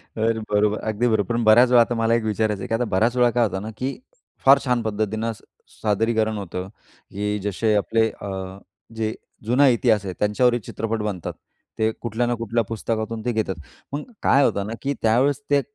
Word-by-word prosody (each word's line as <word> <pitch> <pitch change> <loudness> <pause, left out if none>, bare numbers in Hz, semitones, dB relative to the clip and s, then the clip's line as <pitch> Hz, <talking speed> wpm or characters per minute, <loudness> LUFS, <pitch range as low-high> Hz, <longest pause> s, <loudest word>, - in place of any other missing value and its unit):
तर 115 0 0
बरोबर, 105 +1 +2
अगदी 110 +2 -1
बरोबर. 110 -1 +1
पण 120 - 0
बऱ्याच 115 +3 +6
वेळा 125 -1 +6
आता 120 +1 +1
मला 115 0 +1
एक 115 - 0
विचारायचं 105 -1 -1
आहे - - -5
की - - -3
आता 115 +2 +1
बऱ्याच 110 +6 +2
वेळा 120 -1 +5
काय 120 0 +2
होतं 95 -3 -3
ना 110 - -6
की 130 +3 -3 0.5
फार 135 +1 +8
छान 125 -2 +1
पद्धतीने 110 +1 -2 0.5
सादरीकरण 110 +1 +1
होतं, 90 -2 -5 0.4
की 105 +1 -2
जसे 105 +2 0
आपले 110 +2 +2
अ, 95 -2 -7 0.4
जे 110 -1 -1 0.3
जुना 125 +5 +4
इतिहास 115 -4 +3
आहे 95 - -4
त्यांच्यावरही 120 +4 +2
चित्रपट 115 0 -3
बनतात, 100 -5 -4 0.5
ते 110 0 +2
कुठल्या 120 +1 -1
ना 120 - +1
कुठल्या 115 0 -1
पुस्तकातून 110 +1 -4
ते 125 - +1
घेतात. 110 -4 -1 0.4
मग 145 - -2 0.2
काय 140 +1 +5
होतं 100 0 0
ना 110 - -4
की 140 +1 -1
त्यावेळेस 130 +6 +2
ते 145 -1 +4
110 Hz, 190 wpm, -23 LUFS, 105-120 Hz, 0.5 s, फार